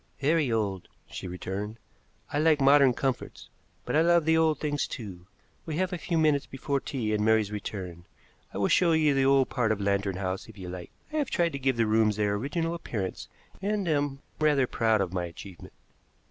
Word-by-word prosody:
"Very 145 -2 +2
old," 100 -5 -1 0.2
she - - -7
returned. 95 +4 -5 0.6
"I 145 - +1
like 155 -1 +4
modern 140 -1 +6
comforts, 130 -2 -3 0.4
but - - -2
I 155 - +5
love 170 -1 +4
the 160 0 +4
old 160 -1 +2
things 145 -2 -1
too. 95 -6 -8 0.4
We 160 - -3
have 185 0 0
a - - -1
few 165 +1 -1
minutes 150 -3 +2
before 140 +1 -2
tea 115 -6 -3
and 105 0 +1
Mary's 110 -1 +3
return. 95 -4 -6 0.5
I - - -7
will 100 - +2
show 170 -2 +4
you 155 -2 +3
the 135 -1 +2
old 135 -1 +4
part 120 -4 0
of 110 - 0
Lantern 100 -1 0
House, 95 +2 -4
if 110 - -13
you 90 -2 -7
like. 90 -1 -7 0.2
I - - -1
have 290 -4 0
tried 170 -1 +1
to 140 - -5
give 130 -2 +1
the 115 - +3
rooms 110 -1 +3
their 105 -1 0
original 155 +10 -2
appearance, 105 - -4 0.3
and 200 -1 -1
am 145 -3 -1 0.2
rather 150 -4 +3
proud 110 -3 +1
of 95 -2 -2
my 90 -1 -1
achievement." 85 +2 -11
130 Hz, 200 wpm, -28 LUFS, 100-155 Hz, 0.6 s, modern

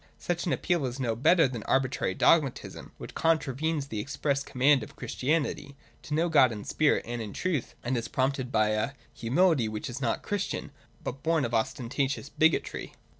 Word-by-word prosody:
Such 175 0 -2
an - - +1
appeal 170 -7 0
is 125 +2 -6
no 120 -4 0
better 165 +6 +5
than 125 -2 -5
an - - -10
arbitrary 130 0 +1
dogmatism, 150 -6 +1
which - - -9
contravenes 155 -1 0
the 110 - -3
express 140 +3 -1
command 135 +1 +3
of 110 - -9
Christianity, 140 0 -2 0.3
to 150 - -3
know 165 +2 +2
God 145 -7 +5
in 105 -2 -6
spirit 155 +6 +1
and 120 0 -3
in 105 -2 -6
truth, 170 -9 -2
and 125 +2 -1
is 115 -1 -2
prompted 130 0 -1
by 110 -3 +3
a 110 +6 0 0.2
humility 135 +1 +2
which 110 +4 -4
is 130 +3 -6
not 120 -3 -1
Christian, 205 -1 -3 0.3
but 135 +2 -5
born 160 -4 +2
of 120 - -4
ostentatious 135 +4 -1
bigotry. 160 +2 +1
135 Hz, 180 wpm, -28 LUFS, 120-155 Hz, 0.3 s, better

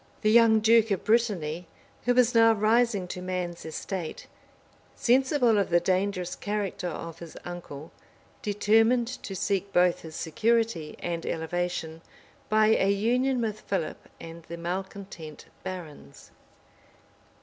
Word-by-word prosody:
{1203.} 215 - +4
The - - +4
young 225 -2 +6 0.2
duke 225 - -13
of 195 -3 -1
Brittany, 180 -8 0 0.4
who 245 0 +3
was 245 -1 +4
now 225 -1 +6
rising 220 -2 +2
to 180 - -5
man's 180 -2 -4
estate, 160 +1 -5 0.7
sensible 250 -2 +3
of 200 - 0
the 175 0 +4
dangerous 185 0 -1
character 205 -3 -3
of 165 -1 -6
his 170 -2 -10
uncle, 170 -4 -8 0.5
determined 225 +2 +3
to 195 - -6
seek 200 +1 -1
both 180 -1 +3
his 160 -1 -10
security 220 -3 0
and 170 -1 -3
elevation 165 -1 -3 0.5
by 215 0 +4
a 195 -3 +3
union 245 +6 +1
with 215 -2 -2
Philip 190 -6 -4
and 165 0 -9
the 170 - -7
malecontent 175 -2 -6 0.2
barons. 175 - -9
195 Hz, 130 wpm, -27 LUFS, 170-225 Hz, 0.7 s, young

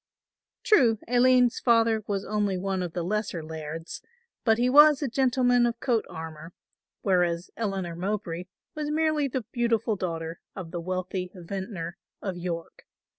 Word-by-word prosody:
True, 245 - +5
Aline's 245 0 +4
father 230 -2 +3
was 200 -1 -2
only 205 -3 0
one 190 0 -2
of 175 -2 -4
the 175 - -2
lesser 195 -3 -2
Lairds, 160 +1 -6 0.4
but 220 -2 +4
he 245 +1 +2
was 295 +2 +7
a - - +1
gentleman 245 -1 +3
of 235 -1 -3
coat 235 -4 +1
armour, 160 +1 -8 0.5
whereas 175 -3 +1
Eleanor 195 -6 -3
Mowbray 180 -2 -3 0.3
was 300 -1 -3
merely 310 -1 +1
the 255 -3 -3
beautiful 230 -2 +1
daughter 165 -3 -4
of 180 -4 -7
the 175 -2 -4
wealthy 185 +1 -3
vintner 185 -1 -5 0.2
of 190 -3 -4
York. 170 -1 -6
200 Hz, 145 wpm, -27 LUFS, 175-240 Hz, 0.5 s, was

